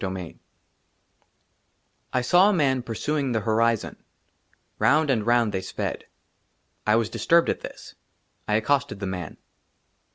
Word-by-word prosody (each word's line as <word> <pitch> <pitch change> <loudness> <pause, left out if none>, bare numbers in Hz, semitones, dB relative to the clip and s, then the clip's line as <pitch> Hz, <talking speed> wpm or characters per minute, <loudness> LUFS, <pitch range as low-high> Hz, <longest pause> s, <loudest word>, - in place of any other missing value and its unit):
24 95 -3 -4
XXIV - - -26 1.7
I 125 - +1
SAW 175 +10 +5
A - - +2
MAN 135 -7 +1
PURSUING 135 +3 -2
THE 110 - 0
HORIZON; 115 +1 0 0.8
ROUND 155 -1 +3
AND 115 -4 -1
ROUND 120 -2 +3
THEY 95 -2 -2
SPED. - - -5 0.8
I 105 - +4
WAS 115 -1 0
DISTURBED 170 0 +3
AT - - -4
THIS; - - -10 0.5
I 105 - +1
ACCOSTED 135 0 0
THE 100 - -4
MAN. 95 -2 -5
115 Hz, 135 wpm, -25 LUFS, 105-140 Hz, 1.7 s, SAW